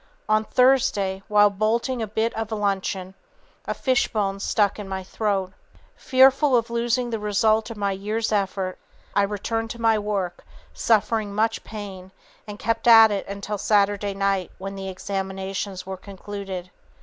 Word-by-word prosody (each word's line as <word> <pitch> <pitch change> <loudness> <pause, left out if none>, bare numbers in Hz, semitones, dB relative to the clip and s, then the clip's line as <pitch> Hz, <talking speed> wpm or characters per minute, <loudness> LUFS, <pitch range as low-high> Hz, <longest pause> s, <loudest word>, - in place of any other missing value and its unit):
On 215 0 +3
Thursday, 215 -6 +2
while 205 -1 +5
bolting 230 +5 0
a 220 - -2
bit 220 +2 -1
of 225 0 -4
luncheon, 195 -3 -2 0.5
a - - -2
fishbone 210 -6 0
stuck 205 0 +1
in 200 -2 -7
my 190 0 -4
throat. 195 -1 -2 0.4
Fearful 265 +1 +4
of 230 0 -2
losing 235 +1 0
the 225 - -2
result 215 +2 +2
of 230 - -7
my 200 -1 0
year's 210 +4 -2
effort, 195 -2 -1 0.3
I 205 - +3
returned 215 +3 -2
to 235 - -7
my 225 -1 +3
work, 200 -4 -3 0.3
suffering 215 -2 +1
much 225 +1 0
pain, 195 -3 -8 0.4
and 205 0 -7
kept 230 +1 -1
at 225 -2 +9
it 200 -1 -3
until 200 +1 -5
Saturday 205 -1 +1
night, 195 -2 0
when 195 +1 -6
the 195 -1 -6
examinations 190 0 -4
were 190 0 -5
concluded. 195 -1 -7
205 Hz, 150 wpm, -24 LUFS, 195-225 Hz, 0.5 s, at